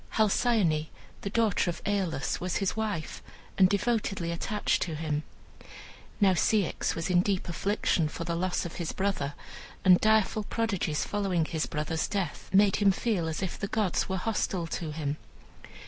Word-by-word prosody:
Halcyone, 205 -7 +2 0.3
the 200 - -3
daughter 215 -4 +2
of 170 - -4
Aeolus, 190 -8 -1
was 180 0 -2
his 195 -2 0
wife, 210 -7 -3 0.3
and 185 -1 +5
devotedly 200 -4 0
attached 210 +5 0
to 165 -3 -2
him. 150 -1 -2 1.0
Now 195 -3 +5
Ceyx 195 +1 +1
was 165 +3 -2
in 175 -1 +5
deep 190 -1 -1
affliction 175 -2 0
for 170 - -5
the 170 0 -2
loss 180 +2 -1
of 170 - -6
his 170 -2 -3
brother, 190 -8 -1 0.5
and 180 -1 +7
direful 215 0 +3
prodigies 195 -10 -1
following 195 -5 0
his 160 -1 -2
brother's 155 +2 -2
death 195 -7 -3
made 195 0 +5
him 205 -2 +4
feel 190 -4 -1
as 160 +4 -3
if 190 - -4
the 200 - -2
gods 205 -4 0
were 190 - 0
hostile 190 -3 -1
to 165 -1 -4
him. 150 -1 -3
185 Hz, 165 wpm, -29 LUFS, 165-205 Hz, 1.0 s, and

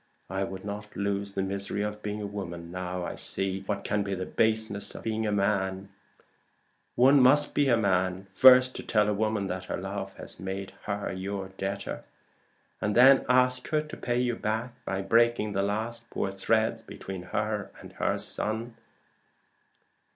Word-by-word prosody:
I 95 0 -1
would 95 0 -6
not 105 +1 -6
lose 100 0 -2
the 95 - -1
misery 100 +1 -3
of 105 0 -4
being 105 0 -4
a - - -2
woman, 85 -4 -6
now 90 0 -4
I - - -4
see 95 0 -3
what 100 -2 -2
can 105 0 0
be 100 -1 -2
the 95 0 -4
baseness 110 -2 0
of - - -9
a 110 -1 -1
man. 100 -1 0 1.1
One 135 +3 +6
must 145 +4 +5
be 145 -2 +2
a 120 - +5
man 95 -2 +1
first 130 +3 +7
to - - -4
tell 105 -1 +2
a 105 - +2
woman 110 -1 0
that 95 -1 -4
her - - -3
love 95 0 -5
has - - -7
made 95 +1 -5
her 100 -2 -3
your 95 +1 -4
debtor, 95 +1 -4 0.8
and 105 - 0
then 130 +2 +7
ask 125 0 +3
her 155 -1 +1
to 150 0 -9
pay 120 0 -1
you 125 -1 +1
by 110 -2 -3
breaking 115 -1 +3
the 100 - +1
last 110 +4 -3
poor 95 - -2
threads 110 +3 +1
between 95 -4 -8
her 105 +3 -2
and - - -12
her - - 0
son." 115 +2 -2
105 Hz, 170 wpm, -28 LUFS, 95-115 Hz, 1.1 s, first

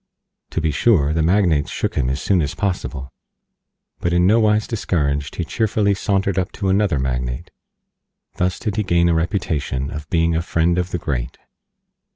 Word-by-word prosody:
To - - -2
be 80 -1 0
sure, 75 -6 +3
the 80 - +1
Magnates 85 -4 +2
shook - - -2
him 65 -4 0
as 65 +2 -1
soon 95 0 +2
as 75 - -2
possible, 90 -9 -3 0.9
but 85 - -1
in 90 0 +3
no 110 +5 +5
wise 105 -1 +3
discouraged 75 - -1
he 90 - -2
cheerfully 105 +1 +1
sauntered 95 -1 0
up 95 - -2
to 100 -2 -2
another 95 -4 +2
Magnate. 60 -2 -3 0.9
Thus 90 0 0
did 105 -1 -3
he 105 - +2
gain 85 -2 +2
a - - +3
Reputation 80 -6 -1
of 75 +1 -7
being 85 -1 +2
a 80 - +1
friend 85 +1 +1
of 90 0 -2
the 90 - -2
Great. 65 -6 -3
85 Hz, 180 wpm, -20 LUFS, 75-100 Hz, 0.9 s, no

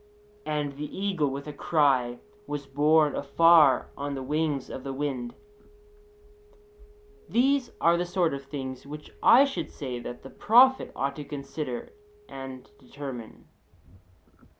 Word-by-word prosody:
And 145 -2 -2
the 150 0 -6
eagle, 190 -8 0
with 140 +1 -6
a 150 - -7
cry, 135 -6 +1 0.3
was 145 -1 -4
borne 150 +2 +3
afar 155 0 +4
on 140 0 -4
the 135 - -5
wings 150 -1 -1
of 130 - -8
the 135 - -5
wind 135 -4 -4
(Il.).' 420 0 -29 0.7
These 260 +1 +2
are 170 +1 +4
the 175 - -1
sort 175 -3 +1
of 140 0 -5
things 135 -2 -7
which 150 +1 -9
I 265 +4 +7
should 275 - -4
say 130 -5 -6
that 120 0 -8
the 135 - -11
prophet 255 +4 +4
ought 140 +1 -2
to 150 - -5
consider 140 - -6 0.3
and 130 -1 -9
determine. 130 -4 -9
145 Hz, 140 wpm, -27 LUFS, 135-185 Hz, 0.7 s, I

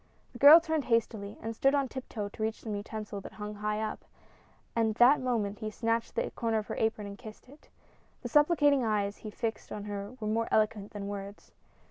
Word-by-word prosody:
The 240 - -10
girl 295 +4 +10
turned 320 -4 -2
hastily 220 -3 -1
and 225 0 -4
stood 270 +5 +3
on 280 -2 +1
tiptoe 240 -5 -5
to 215 - -11
reach 220 0 -2
some 220 - -5
utensil 210 0 -5
that - - -10
hung 210 0 -6
high 210 +1 -2
up; 215 0 -4 0.7
at 225 -2 +1
that 250 +5 +6
moment 220 -5 -1
he 215 - -3
snatched 230 +1 -1
the - - -1
corner 225 -1 -1
of 215 - -2
her - - -3
apron 220 -1 0
and 200 0 -8
kissed 220 -1 -11
it. 285 +4 -18 0.5
The - - -3
supplicating 295 -3 +4
eyes 205 -2 0
he 215 - -8
fixed 220 +1 -4
upon 205 - -6
her 205 +1 -5
were 215 - -5
more 225 +2 0
eloquent 215 -1 +1
than 200 -1 -5
words. 200 0 -7
220 Hz, 205 wpm, -30 LUFS, 210-240 Hz, 0.7 s, girl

